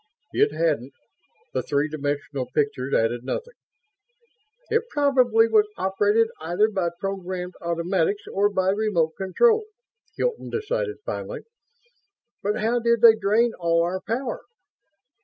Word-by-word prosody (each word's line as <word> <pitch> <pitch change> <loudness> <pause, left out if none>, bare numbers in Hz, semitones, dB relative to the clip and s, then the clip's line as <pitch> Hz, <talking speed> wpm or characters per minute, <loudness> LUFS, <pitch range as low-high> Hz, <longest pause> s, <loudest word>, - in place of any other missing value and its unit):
It 430 +1 +3
hadn't. 145 -6 -1 0.6
The - - 0
three 145 0 0
dimensional 145 -3 -3
pictures 140 -3 0
added 115 +2 +1
nothing. 475 - -4 1.2
"It 455 +1 +3
probably 255 -6 +3
was 215 -2 +4
operated 205 +4 +2
either 175 +7 +1
by 190 -5 -1
programmed 185 -2 -4
automatics 170 +3 0
or 200 +1 +3
by 190 -2 +1
remote 195 -6 +1
control," 435 - +3 0.5
Hilton - - -2
decided, 450 0 -2
finally. - - -5 1.0
"But 205 +2 0
how 235 +3 +1
did 235 -1 +2
they 230 -2 +9
drain 220 +3 +2
all 170 -1 +2
our 185 +2 -2
power? 240 +5 -3
195 Hz, 120 wpm, -24 LUFS, 170-230 Hz, 1.2 s, they